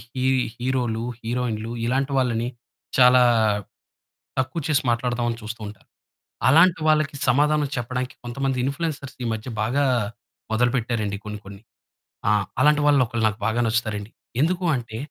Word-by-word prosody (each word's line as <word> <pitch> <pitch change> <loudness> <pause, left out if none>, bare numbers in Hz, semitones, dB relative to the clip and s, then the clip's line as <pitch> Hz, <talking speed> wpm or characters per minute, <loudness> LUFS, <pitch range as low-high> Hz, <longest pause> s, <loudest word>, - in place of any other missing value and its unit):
హి 130 0 -1 0.3
హీరో‌లు 120 -3 -1 0.2
హీరోయిన్‌లు, 115 -1 -2
ఇలాంటి 135 +3 0
వాళ్ళని 120 -2 +1 0.5
చాలా 125 0 +7 1.2
తక్కువ 130 +5 -1
చేసి 150 -1 +2
మాట్లాడదాం 120 0 0
అని 115 - -5
చూస్తూ 110 +1 -6
ఉంటారు. 105 - -13 0.6
అలాంటి 165 +4 +6
వాళ్ళకి 155 -1 +2
సమాధానం 150 +2 +3
చెప్పడానికి 125 +1 -3
కొంతమంది 130 +1 -2
ఇంప్ల్యూయన్సర్స్ 140 -1 -3
ఈ - - -1
మధ్య 110 +3 -5
బాగా 135 +6 +1 0.7
మొదలుపెట్టారండి 115 -3 0
కొన్ని 105 0 -5
కొన్ని. 100 +1 -11 0.7
ఆ! - - +4 0.3
అలాంటి 150 0 +5
వాళ్ళు 145 -2 +5
ఒకలు 115 -1 -2
నాకు 105 0 -3
బాగా 115 +2 +1
నచ్చుతారండి. 110 -2 -2 0.3
ఎందుకు 180 +3 +1
అంటే 115 -2 -5
125 Hz, 130 wpm, -23 LUFS, 115-140 Hz, 1.2 s, చాలా